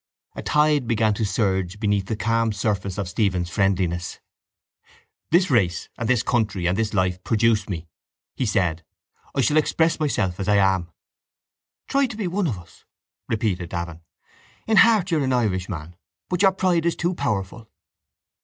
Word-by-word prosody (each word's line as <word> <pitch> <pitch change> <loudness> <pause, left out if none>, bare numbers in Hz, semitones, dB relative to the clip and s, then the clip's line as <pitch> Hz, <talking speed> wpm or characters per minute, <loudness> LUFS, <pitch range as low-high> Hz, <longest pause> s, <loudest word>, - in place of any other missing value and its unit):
A - - -5
tide 150 -3 +2
began 110 -2 +2
to 105 - -2
surge 95 -2 -1
beneath 100 -3 0
the 110 - -2
calm 115 0 +1
surface 100 -1 -2
of 100 -3 -2
Stephen's 90 -2 -1
friendliness. 90 -3 0 1.1
—This 175 0 +3
race 95 -9 +1
and 115 -1 -3
this 125 -3 +3
country 110 -8 0
and 90 - +1
this 110 0 -1
life 95 -1 0
produced 110 -2 +2
me, 85 -3 -5 0.5
he 130 - -1
said. 85 -6 0 0.5
I 135 - +2
shall 145 +6 +2
express 160 +2 +2
myself 95 - -1
as 95 - -3
I 105 - +4
am. 95 -3 +2 1.0
—Try 275 0 +2
to 225 -3 -8
be 215 - -2
one 180 +1 0
of 115 -9 -2
us, 85 - -16 0.5
repeated 100 -6 -1
Davin. 85 -2 -5 0.6
In 220 -1 +2
heart 215 -5 +5
you 160 - +2
are - - 0
an 130 -1 0
Irishman 95 -8 -2 0.3
but 180 -1 -1
your 195 -1 +6
pride 180 -3 +1
is 170 - +1
too 175 +2 -1
powerful. 110 - -3
105 Hz, 165 wpm, -23 LUFS, 95-145 Hz, 1.1 s, your